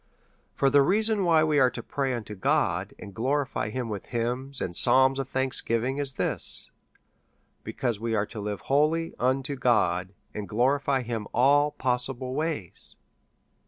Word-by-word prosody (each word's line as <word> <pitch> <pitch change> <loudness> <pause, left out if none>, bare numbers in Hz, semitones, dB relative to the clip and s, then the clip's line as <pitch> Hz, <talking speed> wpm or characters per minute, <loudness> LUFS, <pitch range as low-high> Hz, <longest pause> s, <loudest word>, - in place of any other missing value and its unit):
For 135 - +2
the 145 0 +6
reason 210 +5 +2
why 165 -2 +4
we 155 -2 +2
are 130 -1 +5
to 125 - -8
pray 135 -2 -2
unto 110 -3 -6
God, 95 - 0
and 100 - -10
praise 135 -2 -1
him 125 -2 -3
with 105 -4 -5
hymns, 125 +3 -3
and 85 - -4
psalms 130 +5 +5
of 135 -1 -4
thanksgiving, 130 0 0
is 140 -2 -1
this, - - -3 0.9
because 120 -5 -3
we 115 0 -1
are 105 -1 +1
to 110 - -9
live 105 -1 -4
wholly 155 +4 +1
unto 135 +3 0
God, 95 -7 +1 0.2
and 105 -1 -6
glo 120 +4 +1
rify 135 -2 0
him 115 -3 -4
all 145 +4 +4
possible 130 -1 -2
ways. 150 - -4
130 Hz, 160 wpm, -27 LUFS, 115-140 Hz, 0.9 s, the